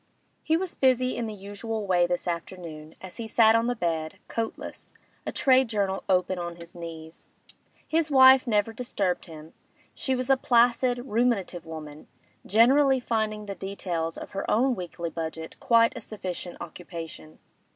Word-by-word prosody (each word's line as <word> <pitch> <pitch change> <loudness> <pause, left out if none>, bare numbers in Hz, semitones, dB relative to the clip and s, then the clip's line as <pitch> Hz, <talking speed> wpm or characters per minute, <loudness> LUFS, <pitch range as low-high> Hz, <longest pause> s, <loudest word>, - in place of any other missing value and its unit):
He 320 - +2
was 370 0 -3
busy 255 -1 +2
in 235 -1 -2
the 215 - -5
usual 205 +2 -5
way 175 -2 +3
this 175 +1 -2
afternoon, 165 -2 -6
as 190 -1 -8
he 230 -2 -5
sat 220 0 +5
on 230 +1 +2
the 245 - 0
bed, 165 -6 -2
coatless, 225 -1 -5 0.3
a - - -1
trade 260 -2 +4
journal 200 -3 -1
open 185 0 +2
on 175 0 -4
his 170 0 -12
knees. 165 -2 -10 0.6
His 320 -1 +1
wife 265 -2 +7
never 215 0 +1
disturbed 205 -6 -2
him; 160 -1 -12 0.4
she 265 - -1
was 255 +1 0
a 270 - +5
placid, 245 0 +3
ruminative 210 -8 0
woman, 155 -2 -9 0.4
generally 265 +5 +5
finding 215 -3 -2
the 200 - -5
details 180 -4 -4
of - - -8
her 195 - -4
own 255 +4 +3
weekly 175 -4 -5
budget 160 0 -6
quite 230 -4 +4
a - - -6
sufficient 180 -4 -6
occupation. 165 -2 -9
205 Hz, 160 wpm, -27 LUFS, 170-245 Hz, 0.6 s, wife